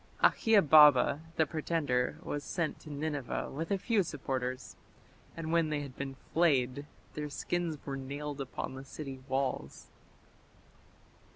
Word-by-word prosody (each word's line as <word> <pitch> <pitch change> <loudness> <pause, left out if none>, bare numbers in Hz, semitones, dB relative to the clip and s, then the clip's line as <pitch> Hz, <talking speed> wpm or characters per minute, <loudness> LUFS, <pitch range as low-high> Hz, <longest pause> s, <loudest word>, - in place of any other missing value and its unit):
Akhiababa 150 - +6 0.2
the 160 - +3
pretender 150 -5 -1
was 145 0 -3
sent 170 -1 -2
to 155 - -12
Nineveh 145 -3 -3
with 160 +4 -4
a 200 - +2
few 215 +2 +2
supporters; 130 -5 -4 0.6
and 160 -1 -4
when 165 -2 +3
they 150 -1 -1
had 135 -3 -8
been 135 -1 -5 0.2
flayed 145 -4 +2 0.3
their 150 -1 -4
skins 170 +1 -2
were 135 -1 -3
nailed 140 +2 -5
upon 130 0 -5
the 130 0 -8
city 135 -1 -7
walls. 130 - -3
145 Hz, 130 wpm, -32 LUFS, 135-160 Hz, 0.6 s, Akhiababa